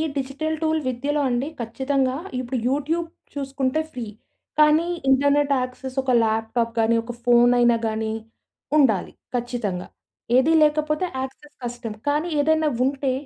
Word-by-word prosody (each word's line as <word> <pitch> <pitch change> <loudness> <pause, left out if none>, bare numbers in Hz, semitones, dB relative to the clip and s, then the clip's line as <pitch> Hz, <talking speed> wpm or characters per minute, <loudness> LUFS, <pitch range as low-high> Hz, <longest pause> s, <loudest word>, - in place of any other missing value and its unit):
Digital 280 +4 -2
tool 315 0 +1
విద్యలో 280 +4 -1
అండి 245 +3 0
ఖచ్చితంగా, 260 +3 0 0.2
ఇప్పుడు 255 +1 -3
యూట్యూబ్ 310 +5 -1 0.3
చూసుకుంటే 275 +1 -1
ఫ్రీ 245 -5 -5 0.5
కానీ, 305 +2 +5 0.2
ఇంటర్నెట్ 285 +2 +3
యాక్సెస్, 255 +1 -6
ఒక 260 - 0
ల్యాప్టాప్ 225 +1 0
గానీ, 225 +1 +3
ఒక 240 - -6
ఫోనైనా 240 0 +5
గాని 220 0 -2 0.7
ఉండాలి 230 -10 +3 0.2
ఖచ్చితంగా. 235 -7 -3 0.5
ఏది 300 +5 +4
లేకపోతే 305 +2 +1
యాక్సెస్ 270 +3 -7
కష్టం. 240 -2 -5
కానీ 300 +4 +1
ఏదైనా 315 +1 +3 0.2
ఉంటే 270 -1 0
265 Hz, 120 wpm, -23 LUFS, 240-295 Hz, 0.7 s, కానీ